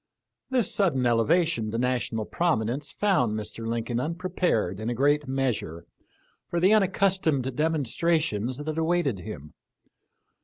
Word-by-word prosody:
This 250 -6 0
sudden 150 -11 +1
ele 115 -1 +3
vation 160 -10 +2
to 115 - -3
national 120 -3 -1
prominence 140 -3 -1
found 130 - +1
Mr. 110 +1 -5
Lincoln 115 +1 -2
unprepared 165 - -1
in 110 +2 -3
a 120 - -2
great 145 +3 +2
measure 120 -11 -2 0.6
for 175 - -1
the 185 +4 +4
unaccus 195 -2 +3
tomed 135 -5 0
demonstrations 155 -5 0
that 155 +2 -3
awaited 160 - +1
him. 85 -7 -9
135 Hz, 130 wpm, -26 LUFS, 115-170 Hz, 0.6 s, the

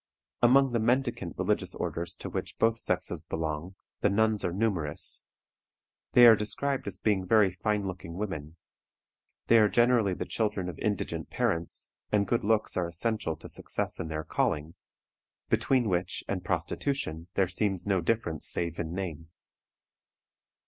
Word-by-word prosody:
Among 135 +2 +5
the 120 - +1
mendicant 125 +2 0
religious - - 0
orders 85 +1 -3
to - - -7
which - - -4
both 115 0 +2
sexes - - -1
belong, 80 +3 -4 0.2
the - - +3
nuns 110 0 +2
are 90 - 0
numerous. 90 -7 0 0.9
They 120 - +9
are 115 -1 +10
described 135 +6 -2
as - - -4
being 100 -4 +1
very 100 0 +4
fine 105 +3 -1
looking 90 -3 -6
women. 80 -6 -5 0.9
They 115 - +6
are 105 -1 +5
generally 120 -5 +3
the - - -4
children 105 -5 -1
of 85 - -8
indigent 105 -3 -2
parents, 85 +1 -2 0.2
and 105 -1 +3
good 120 +2 +1
looks 110 +1 +1
are 90 -2 +1
essential 85 0 -1
to - - -10
success - - -3
in 80 - -3
their 80 0 -3
calling, 75 +1 -1 0.8
between 130 -4 +2
which 90 -2 -1
and - - -2
prostitution 85 - -2
there 95 - +3
seems 95 0 -1
no 95 -3 +1
difference 85 -5 -1
save 85 -1 0
in 85 0 -3
name. 85 -4 -5
100 Hz, 150 wpm, -29 LUFS, 85-115 Hz, 0.9 s, are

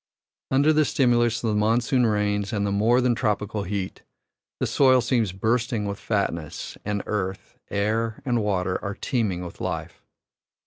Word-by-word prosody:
Under 140 +4 +4
the 155 0 +4
stimulus 120 -4 +2
of 115 - +1
the - - 0
monsoon 115 +4 +2
rains 105 -1 0
and 100 -3 0
the 100 - -1
more 115 +5 +3
than 125 -1 +3
tropical 105 -1 -1
heat, 95 0 -4 0.6
the - - +1
soil 130 -2 +4
seems 120 -5 +1
bursting 110 +3 0
with 100 0 -4
fatness, 85 -8 -2
and 105 0 -2
earth, 95 -2 -4
air, 110 +2 -1
and 120 -3 +1
water 95 -3 -1
are 100 0 -3
teeming 105 -10 -1
with 85 - -10
life. - - -4
105 Hz, 160 wpm, -25 LUFS, 100-120 Hz, 0.6 s, Under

